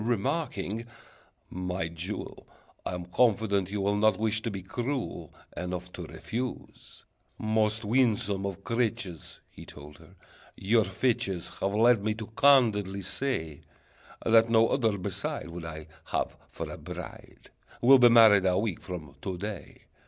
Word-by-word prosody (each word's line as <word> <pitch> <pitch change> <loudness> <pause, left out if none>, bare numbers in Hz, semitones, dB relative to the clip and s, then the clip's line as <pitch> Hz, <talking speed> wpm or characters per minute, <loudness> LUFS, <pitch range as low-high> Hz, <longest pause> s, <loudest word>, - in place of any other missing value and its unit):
Remarking, 115 - -2 0.6
"My 90 -1 -3
jewel, 85 +5 -6 0.4
I'm 90 -1 -4
confident 100 -2 +2
you 100 0 -2
will 100 +1 +1
Not 110 +1 +3
wish 110 0 +1
to 115 - -2
be 100 -3 -6
cruel 125 +6 -4 0.2
Enough 90 0 -5
to - - -7
refuse. 125 +2 -6 0.3
"Most 110 0 0
winsome 105 -4 +1
of 100 0 -7
creatures," 105 -8 -3
He - - -12
told 75 0 -12
her, - - -18 0.4
"your 110 +2 +3
features 95 -3 -1
Have 100 +1 -1
led 115 -1 +4
me 105 0 0
to 110 0 -6
candidly 110 -6 +3
say 80 - -2 0.6
That 115 0 +5
no 115 0 +4
other 115 -6 +1
beside 95 -2 -4
Would 85 0 -7
I 80 -1 -7 0.2
have - - -2
for - - -6
a - - -8
bride: - - -10 0.3
We'll 130 +2 +7
be 120 -1 +8
married 110 -5 +7
a 90 0 +2
week 105 -5 -1
from 80 -7 -7
to 95 -2 -4
day! 105 +3 -7
105 Hz, 145 wpm, -28 LUFS, 90-115 Hz, 0.6 s, be